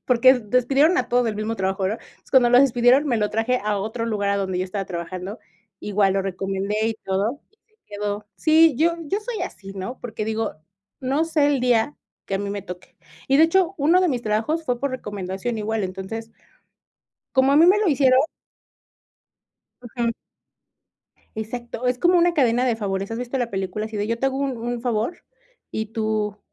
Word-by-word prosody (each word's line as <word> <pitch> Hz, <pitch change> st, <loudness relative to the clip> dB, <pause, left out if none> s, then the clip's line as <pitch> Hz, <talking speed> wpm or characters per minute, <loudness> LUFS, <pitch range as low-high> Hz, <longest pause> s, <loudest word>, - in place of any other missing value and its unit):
porque, 255 Hz, +1 st, +6 dB
despidieron 270 Hz, -, +2 dB
a -, -, -1 dB
todos 245 Hz, 0 st, +2 dB
del 220 Hz, -2 st, -1 dB
mismo 220 Hz, +1 st, -3 dB
trabajo, 190 Hz, 0 st, -1 dB
¿verdad? 210 Hz, +4 st, -1 dB
Entonces -, -, -25 dB
cuando 250 Hz, -3 st, +5 dB
lo 245 Hz, +1 st, +7 dB
despidieron, 255 Hz, +2 st, +4 dB
me 240 Hz, -4 st, +1 dB
lo 210 Hz, -1 st, 0 dB
traje 230 Hz, +3 st, +1 dB
a 210 Hz, -1 st, 0 dB
otro 225 Hz, +3 st, -3 dB
lugar 205 Hz, -3 st, -1 dB
a 200 Hz, -, +1 dB
donde 190 Hz, -2 st, -2 dB
yo 185 Hz, -, 0 dB
estaba 195 Hz, +1 st, -4 dB
trabajando, 185 Hz, +3 st, -6 dB, 0.4 s
igual 200 Hz, -2 st, +1 dB
lo 195 Hz, -, +1 dB
recomendé 195 Hz, +2 st, -3 dB
y 225 Hz, -, -2 dB
todo 200 Hz, +9 st, -1 dB
y 435 Hz, -, -35 dB
se 435 Hz, -1 st, -39 dB
quedó. 205 Hz, 0 st, -4 dB
Sí, 315 Hz, -2 st, +5 dB
yo 335 Hz, +5 st, +3 dB
yo 390 Hz, +8 st, -1 dB
soy 460 Hz, 0 st, -4 dB
así, 195 Hz, -1 st, -7 dB
¿no? 215 Hz, +7 st, -6 dB
Porque 220 Hz, -3 st, -5 dB
digo, 220 Hz, 0 st, -2 dB, 0.5 s
no 275 Hz, +5 st, +1 dB
sé 310 Hz, -3 st, +2 dB
el 280 Hz, -3 st, +1 dB
día 245 Hz, +2 st, +2 dB, 0.3 s
que 195 Hz, -, -3 dB
a -, -, 0 dB
mí 200 Hz, 0 st, -3 dB
me 200 Hz, -1 st, -4 dB
toque, 180 Hz, -1 st, -10 dB, 0.3 s
y, 275 Hz, -, +4 dB
de 315 Hz, -, +6 dB
hecho, 370 Hz, +2 st, +2 dB
1 330 Hz, +6 st, +4 dB
de 365 Hz, -, +2 dB
mis 245 Hz, -4 st, -1 dB
trabajos 225 Hz, +10 st, -1 dB
fue 245 Hz, -3 st, -1 dB
por 280 Hz, -1 st, -1 dB
recomendación 205 Hz, -1 st, -4 dB
igual, 215 Hz, -1 st, -1 dB
entonces, 195 Hz, +5 st, -6 dB, 1.0 s
como 265 Hz, +1 st, +3 dB
a 280 Hz, -, +4 dB
mí 325 Hz, -, +7 dB
me 395 Hz, +4 st, +5 dB
lo 425 Hz, -, +1 dB
hicieron 265 Hz, -3 st, +4 dB, 1.6 s
Ujú. 235 Hz, -1 st, -2 dB, 1.2 s
Exacto, 240 Hz, +2 st, -5 dB
es 250 Hz, 0 st, 0 dB
como 355 Hz, +4 st, +4 dB
una 345 Hz, 0 st, +4 dB
cadena 250 Hz, -5 st, +2 dB
de 240 Hz, -3 st, +1 dB
favores, 195 Hz, -1 st, -3 dB
¿has 225 Hz, -, -3 dB
visto 245 Hz, +2 st, -3 dB
la 240 Hz, -2 st, -1 dB
película 195 Hz, +2 st, -3 dB
así 220 Hz, -1 st, -7 dB
de 205 Hz, -, -1 dB
yo 230 Hz, +1 st, -1 dB
te 270 Hz, -, +1 dB
hago 270 Hz, 0 st, -1 dB
un 275 Hz, -2 st, -1 dB
un 235 Hz, +1 st, -4 dB
favor 235 Hz, +6 st, -2 dB, 0.5 s
y 220 Hz, 0 st, -2 dB
tú 215 Hz, -2 st, -2 dB
230 Hz, 200 wpm, -23 LUFS, 205-270 Hz, 1.6 s, lo